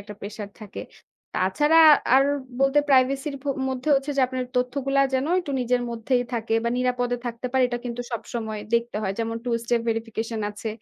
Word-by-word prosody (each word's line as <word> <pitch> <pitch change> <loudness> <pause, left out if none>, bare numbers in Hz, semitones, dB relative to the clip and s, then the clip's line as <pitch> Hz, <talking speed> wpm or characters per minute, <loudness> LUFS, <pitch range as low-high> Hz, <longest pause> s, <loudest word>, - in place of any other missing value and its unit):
একটা 210 0 -10
pressure 205 0 -7
থাকে। 205 -2 -8 0.5
তাছাড়া 295 - +3 0.4
আর 270 +1 +6 0.3
বলতে 275 +2 +3
privacy 270 +1 +3
র - - -5
ভ - - -26 0.2
মধ্যে 260 +2 -3
হচ্ছে 275 +2 0
যে 275 - +3
আপনার 255 0 -3
তথ্যগুলা 275 +2 +1
যেন 260 +2 +1
একটু 295 -6 -6
নিজের 245 0 +1
মধ্যেই 240 +2 0
থাকে 225 -1 -1
বা - - +2
নিরাপদে 245 -1 0
থাকতে 235 +1 -4
পারে 260 -1 +3
এটা 240 -1 -3
কিন্তু 245 0 -4
সবসময় 220 -2 -4
দেখতে 235 -1 0
হয়। 190 -2 -1
যেমন 230 0 -2
2 240 -1 0
step 235 0 +1
verification 225 0 -3
আছে। 210 +2 -6
245 Hz, 185 wpm, -24 LUFS, 225-265 Hz, 0.5 s, আর